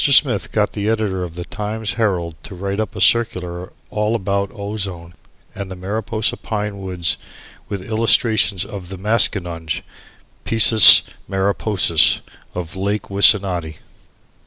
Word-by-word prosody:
Smith 140 -2 +3
got 105 -1 0
the 105 0 -2
editor 105 -5 -1
of 85 -2 -8
the 90 0 -7
Times 105 +1 -5
Herald 90 -7 -1
to 95 - -10
write 100 +2 -4
up 110 - -4
a - - -6
circular 90 -6 0 0.2
all 105 +2 -1
about 100 -2 -2
ozone 100 -5 -6 0.4
and 100 -1 -7
the 95 - -7
Mariposa 110 +4 -3
pine 105 -2 -5
woods, 90 -3 -3 0.5
with 100 -2 -5
illustrations 110 -2 +1
of 95 -3 -9
the 95 - -8
maskinonge 90 -6 -2 0.6
(piscis 110 -1 +8 0.3
mariposis) 95 -3 +2 0.3
of 85 -2 -6
Lake 100 +1 -3
Wissanotti. 95 -5 +3
100 Hz, 130 wpm, -18 LUFS, 90-110 Hz, 0.6 s, piscis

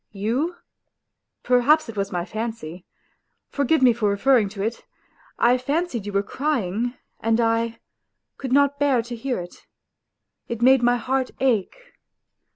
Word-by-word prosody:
You... 240 - -1 0.9
perhaps 250 +5 +3
it 225 - -8
was 200 -1 -2
my 175 -2 -2
fancy.... 205 -5 -6 0.6
Forgive 285 +1 +1
me 245 -2 +6
for 220 -2 0
referring 215 +1 +3
to 195 -1 -5
it; 225 +2 -3 0.5
I 245 +2 +3
fancied 280 - -2
you - - -3
were 200 0 +1
crying, 240 -3 -2 0.2
and 225 +1 +1
I... 230 0 +1 0.6
could 265 -2 -5
not 285 +1 +3
bear 275 -5 +2
to 240 +1 -7
hear 250 0 -3
it... 175 0 -11 0.8
it 235 - -4
made 260 0 +6
my 245 0 +3
heart 260 +2 -1
ache. 240 -8 +1
235 Hz, 145 wpm, -23 LUFS, 210-265 Hz, 0.9 s, me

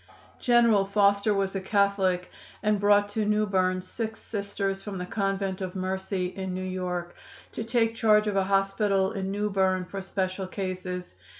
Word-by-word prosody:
"General 235 -5 +4
Foster 200 +1 +3
was 195 -1 0
a 195 - -1
Catholic 190 -2 +1 0.3
and 210 -1 +2
brought 205 0 +4
to 215 +1 -1
New 210 0 +2
Berne 185 -2 +1
six 220 +3 -5
Sisters 200 -2 -3
from 200 -2 -6
the 180 - -4
Convent 195 -1 -2
of 185 0 -4
Mercy, 190 0 -2
in 185 0 -4
New 185 0 -3
York, 180 -2 -3 0.4
to - - -4
take 225 0 +1
charge 215 -2 +4
of 210 -2 -1
a 195 -1 +2
hospital 195 0 +2
in 195 -3 -3
New 205 +1 -1
Berne 190 -1 +1
for 195 +2 -6
special 190 0 -2
cases. 185 - -5
195 Hz, 170 wpm, -27 LUFS, 185-205 Hz, 0.4 s, General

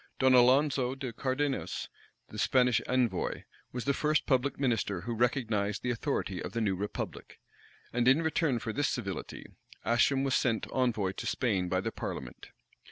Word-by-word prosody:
Don 130 -1 +4
Alonzo 130 +1 +4
de 130 -3 -5
Cardenas, 135 +4 -2 0.4
the - - -7
Spanish 125 -2 +3
envoy, 120 -7 0 0.3
was 125 -1 -4
the 140 - +2
first 150 +1 +1
public 135 0 +1
minister 110 -8 0
who 115 +5 -4
recognized 115 -4 0
the 125 - 0
authority 115 - -2
of - - -6
the 115 - -1
new 100 -4 +1
republic; 100 +3 -5 0.5
and 120 +1 +1
in 140 +6 +5
return 160 -4 +1
for 115 -1 -4
this 145 +3 +1
civility, 100 -6 -5 0.4
Ascham 135 +3 +3
was 135 -1 0
sent 115 -4 +1
envoy 115 -7 +1
into 95 - -5
Spain 95 -8 0
by 95 +1 +1
the - - -3
parliament. 65 -3 -6
125 Hz, 165 wpm, -30 LUFS, 110-135 Hz, 0.5 s, in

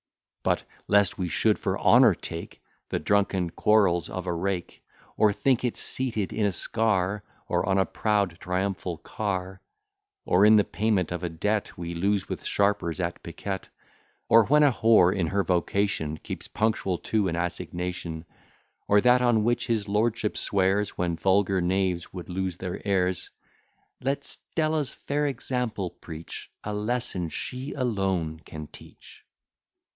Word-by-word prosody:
But, - - +1 0.2
lest 100 -2 +3
we 90 - -1
should 85 - +2
for - - -1
honour - - +6
take 85 0 -8 0.3
The - - -1
drunken 95 -4 +1
quarrels 95 -6 +3
of 95 -1 -5
a 90 - -1
rake: 90 +1 -3 0.3
Or 105 -1 +4
think 125 +4 +1
it 125 - -1
seated 115 -7 -1
in 105 -2 +1
a - - +1
scar, 100 0 0 0.2
Or - - +1
on 95 - +3
a 95 - +3
proud 100 -5 0
triumphal 90 -1 -2
car; 95 -1 -4 0.6
Or - - +4
in 110 +1 +8
the 105 - +6
payment 100 -4 0
of 90 -1 -3
a 90 - -1
debt 105 +6 -2
We 85 -1 -5
lose 95 +3 0
with - - -5
sharpers 100 -4 0
at 85 -1 -3
piquet; 95 +3 -5 0.6
Or 115 -1 +6
when 150 +5 +5
a 145 - +6
whore, 110 -6 +4
in 90 -4 0
her 100 +3 +1
vocation, 90 -3 0
Keeps - - -7
punctual 105 -4 0
to 105 +1 0
an 85 - -1
assignation; 85 -1 -4 0.6
Or 105 0 +5
that 125 +2 +5
on 120 -3 +3
which 120 +2 0
his 110 -3 0
lordship 110 +1 0
swears, 100 +1 +1
When 85 -1 0
vulgar 95 +1 +2
knaves 90 -1 0
would 90 -2 -8
lose 95 -1 -3
their 90 -1 -5
ears; 95 -3 0 0.7
Let 135 +2 -1
Stella's 155 -4 -1
fair 145 +1 -1
example 125 -7 -2
preach 80 -1 -9
A 105 - -4
lesson 105 -5 -1
she 130 - -5
alone 95 - -1
can 75 -1 -8
teach. - - -15
100 Hz, 150 wpm, -26 LUFS, 90-110 Hz, 0.7 s, in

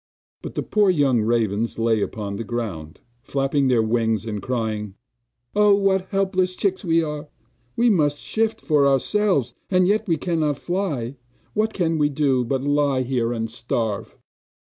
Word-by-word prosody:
But - - -8
the - - -1
poor 210 -2 +2
young 140 -9 +3
ravens 110 -1 0
lay 115 -1 +2
upon 100 -1 -3
the 115 - -4
ground, 100 -10 -5 0.2
flapping 135 +1 0
their 120 -3 +3
wings, 110 -2 0
and 105 -3 -4
crying: 110 -5 -3 0.6
'Oh, 210 -1 +5
what 190 -2 +1
helpless 190 -2 0
chicks 190 0 -1
we 165 -2 +2
are! 150 0 -5 0.5
We 235 0 +4
must 145 -6 +2
shift 220 +7 -1
for 145 -3 +3
ourselves, 140 - +1 0.2
and 185 -1 +3
yet 215 +2 +1
we 165 -3 +2
cannot 155 -3 0
fly! 150 -9 -3 0.4
What 215 +1 +1
can 165 -5 0
we 145 0 +3
do, 135 -3 +1
but 130 +2 -2
lie 145 -2 +1
here 120 -2 -1
and 115 -1 -2
starve? 115 -2 -3
140 Hz, 160 wpm, -23 LUFS, 115-185 Hz, 0.6 s, Oh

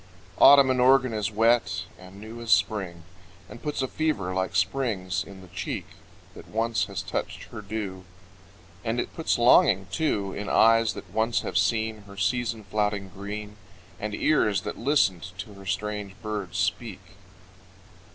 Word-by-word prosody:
Autumn 140 -2 +8
in 130 - 0
Oregon 130 -1 +4
is 105 -2 -1
wet 110 -5 +2
and 95 +2 -13
new 110 +3 -9
As 115 - -7
Spring, 95 -8 +1 0.4
And 120 - -11
puts 150 -3 -2
a - - 0
fever 130 - -1
like 95 0 -2
Spring's 95 -4 0
in 100 -1 -12
the 95 - -13
cheek 90 +2 -4 0.5
That - - -12
once 115 +1 0
has 95 -2 -5
touched 90 - -4
her 105 - -7
dew 100 -3 -5 0.8
And 115 +2 -1
it - - -3
puts 165 - 0
longing 105 -5 +5
too 100 -12 -1
In 105 -1 -5
eyes 115 -1 +4
that - - -10
once 110 +1 +1
have - - -6
seen 110 -2 +1
Her 100 0 -12
season 115 +3 -1
flouting 105 -1 -1
green, 105 +2 -7 0.4
And 105 0 -3
ears 105 - +2
that - - -6
listened 100 - +1
to 95 +4 -7
her 100 -1 -12
strange 100 +1 -3
birds 100 -6 -4
speak. 100 +2 -2
105 Hz, 160 wpm, -26 LUFS, 95-115 Hz, 0.8 s, Autumn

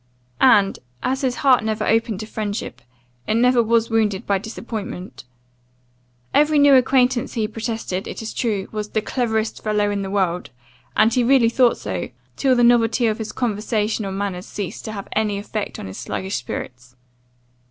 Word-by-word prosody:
And, 205 -7 +5 0.2
as 265 +1 0
his 255 -2 0
heart 255 -4 +5
never 220 0 -1
opened 225 -2 +1
to - - -5
friendship, 205 - -5 0.5
it 215 - +1
never 245 +1 +4
was 230 0 +1
wounded 215 -4 +1
by 200 -1 +1
disappointment. 215 - -7 1.1
Every 300 +1 +4
new 285 -1 +6
acquaintance 255 -1 +3
he 220 -3 0
protested, 220 -4 -4
it - - -6
is 225 -1 -5
true, 210 -5 -1
was 210 -1 -4
'the 215 - 0
cleverest 220 -3 -1
fellow 210 -1 +1
in 200 -1 -2
the 195 - -4
world; 185 -3 -1 0.5
and 220 +1 +4
he 250 - +2
really 245 -2 +4
thought 245 0 +3
so; 95 -4 -4 0.3
till 265 -2 +2
the 240 - +3
novelty 235 0 +4
of 220 -1 0
his 220 - -4
conversation 215 -2 -1
or 195 - -4
manners 190 -1 -4
ceased 200 -3 -6
to 220 - -4
have 200 -2 -6
any 210 -2 0
effect 210 +1 -4
on - - -7
his 95 0 -8
sluggish 190 +1 -3
spirits. 125 0 -7
220 Hz, 175 wpm, -21 LUFS, 200-235 Hz, 1.1 s, new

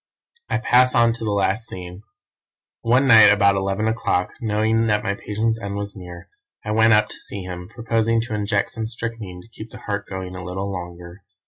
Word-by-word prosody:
"I - - +1
pass 125 +1 +3
on 115 -1 +4
to 115 - -8
the 110 - -1
last 100 +2 0
scene. 90 +1 -8 0.8
One 125 +4 +3
night 110 -5 +8
about 100 -1 +4
eleven 95 +2 -1
o'clock, 90 -5 -1
knowing 110 +1 +1
that 105 -1 +1
my 100 - 0
patient's 110 +3 -2
end 100 -1 -4
was 100 0 -5
near, 90 -2 -10 0.4
I 105 - -2
went 110 +1 +4
up 105 0 +4
to - - -8
see 100 - -4
him, 90 0 -7
proposing 115 0 0
to 115 -1 -6
inject 105 -1 0
some 110 -1 -3
strychnine 115 -5 -6
to - - -18
keep 110 0 -10
the - - -12
heart 100 -1 -4
going 95 -1 -6
a 90 - -7
little 95 +2 -4
longer. 90 0 -8
105 Hz, 200 wpm, -22 LUFS, 95-115 Hz, 0.8 s, night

